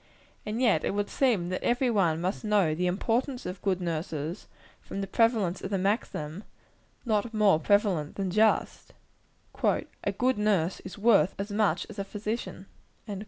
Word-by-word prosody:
And 215 Hz, +2 st, -2 dB
yet 225 Hz, -11 st, +3 dB
it -, -, -1 dB
would 205 Hz, 0 st, -2 dB
seem 220 Hz, -11 st, +1 dB
that 185 Hz, -, -3 dB
every 245 Hz, +1 st, +2 dB
one 170 Hz, -7 st, +2 dB
must 185 Hz, +6 st, -2 dB
know 205 Hz, -7 st, +2 dB
the 180 Hz, +3 st, 0 dB
importance 240 Hz, +8 st, -1 dB
of 180 Hz, +1 st, -6 dB
good 190 Hz, -2 st, 0 dB
nurses, 165 Hz, 0 st, -4 dB, 0.3 s
from -, -, -7 dB
the 195 Hz, -, -1 dB
prevalence 205 Hz, -3 st, +1 dB
of 190 Hz, -, -4 dB
the 195 Hz, -, 0 dB
maxim 190 Hz, -, -2 dB, 0.6 s
not 220 Hz, 0 st, 0 dB
more 205 Hz, -7 st, +4 dB
prevalent 185 Hz, -4 st, +1 dB
than 195 Hz, -2 st, -2 dB
just 215 Hz, +3 st, +1 dB, 0.7 s
"A -, -, 0 dB
good 255 Hz, -2 st, +1 dB
nurse 195 Hz, -5 st, +1 dB
is 185 Hz, -, -9 dB
worth 200 Hz, -6 st, +4 dB
as 200 Hz, +1 st, -4 dB
much 210 Hz, 0 st, +1 dB
as 215 Hz, -1 st, -10 dB
a -, -, 0 dB
physician." 210 Hz, 0 st, -5 dB
200 Hz, 165 wpm, -28 LUFS, 180-220 Hz, 0.7 s, more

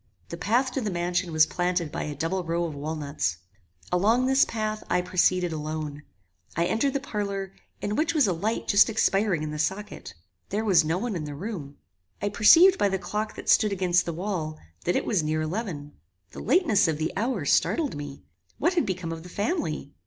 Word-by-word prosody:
The -, -, -5 dB
path 240 Hz, +9 st, +1 dB
to 265 Hz, -, -2 dB
the 215 Hz, -, -2 dB
mansion 175 Hz, -1 st, -1 dB
was 155 Hz, 0 st, +5 dB
planted 175 Hz, -2 st, -1 dB
by -, -, -3 dB
a 150 Hz, -, -5 dB
double 170 Hz, +6 st, -2 dB
row 170 Hz, +1 st, -1 dB
of 165 Hz, -3 st, -3 dB
walnuts. 145 Hz, -, -3 dB, 0.5 s
Along 220 Hz, +8 st, +3 dB
this 265 Hz, +1 st, +4 dB
path 215 Hz, -1 st, -3 dB
I 180 Hz, -, +2 dB
proceeded 180 Hz, -1 st, +2 dB
alone. 155 Hz, -1 st, -4 dB, 0.5 s
I 170 Hz, -, +1 dB
entered 225 Hz, +9 st, +1 dB
the 275 Hz, -, 0 dB
parlour, 200 Hz, -6 st, -4 dB, 0.3 s
in 205 Hz, +1 st, -2 dB
which 325 Hz, +4 st, 0 dB
was 295 Hz, -5 st, +5 dB
a 190 Hz, -, +1 dB
light 210 Hz, +7 st, -2 dB
just 200 Hz, +3 st, +5 dB
expiring 195 Hz, -6 st, +1 dB
in 155 Hz, -, -4 dB
the 150 Hz, -, -5 dB
socket. 190 Hz, -, -3 dB, 0.3 s
There 215 Hz, +3 st, -1 dB
was 190 Hz, -6 st, +5 dB
no 160 Hz, +3 st, 0 dB
one 225 Hz, +1 st, -3 dB
in 155 Hz, -3 st, -3 dB
the 145 Hz, -1 st, -6 dB
room. 160 Hz, -5 st, -6 dB, 0.4 s
I 205 Hz, -, -1 dB
perceived 335 Hz, -, +6 dB
by 200 Hz, -, +3 dB
the 190 Hz, -, 0 dB
clock 210 Hz, +3 st, -4 dB
that -, -, -9 dB
stood 215 Hz, -, +4 dB
against 180 Hz, -2 st, +1 dB
the 170 Hz, -, -2 dB
wall, 165 Hz, -4 st, -3 dB, 0.3 s
that 175 Hz, -, +1 dB
it -, -, 0 dB
was 200 Hz, -6 st, +1 dB
near 155 Hz, +1 st, -1 dB
eleven. 155 Hz, -4 st, -4 dB, 0.4 s
The -, -, -9 dB
lateness 220 Hz, -, +3 dB
of 160 Hz, -2 st, 0 dB
the 160 Hz, +1 st, -2 dB
hour 215 Hz, -, -1 dB
startled 285 Hz, -, +2 dB
me. 145 Hz, -1 st, -8 dB, 0.3 s
What 345 Hz, +5 st, +1 dB
had 345 Hz, -, +1 dB
become 185 Hz, -3 st, -3 dB
of 165 Hz, 0 st, -6 dB
the 180 Hz, -, -11 dB
family? 175 Hz, -, -2 dB
185 Hz, 205 wpm, -26 LUFS, 160-215 Hz, 0.5 s, perceived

